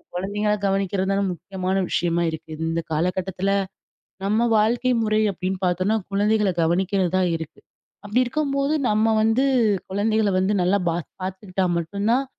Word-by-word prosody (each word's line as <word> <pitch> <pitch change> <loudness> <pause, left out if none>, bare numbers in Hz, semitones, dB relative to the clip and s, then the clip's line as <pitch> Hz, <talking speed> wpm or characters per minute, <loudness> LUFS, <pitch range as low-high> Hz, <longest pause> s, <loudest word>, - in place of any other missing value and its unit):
குழந்தைங்கள 205 +3 -1
கவனிக்கிறது 195 0 0
தான் 195 -1 +1
முக்கியமான 185 +2 -4
விஷயமா 170 0 0
இருக்குது. 160 0 -8
இந்த 165 0 -1
காலகட்டத்துல 180 +4 -1 0.7
நம்ம 220 +4 +2
வாழ்க்கை 240 +4 +2
முறை 215 0 +2
அப்டின்னு 185 +1 -3
பாத்தோனா, 185 +5 +1 0.2
குழந்தைகள 210 0 +2
கவனிக்கிறது 185 +2 +1
தான் 185 -1 +2
இருக்கு. 160 -2 -9 0.5
அப்டி 210 +5 +1
இருக்கும்போது 280 +2 0 0.2
நம்ம 220 +1 +2
வந்து 225 +5 +3 0.4
குழந்தைகள 210 +2 +1
வந்து 190 +3 +1
நல்லா 185 +3 +3
பா - - 0 0.3
பாத்துக்கிட்டா 190 0 -3
மட்டுந்தான் 205 +10 0
195 Hz, 130 wpm, -23 LUFS, 180-215 Hz, 0.7 s, வந்து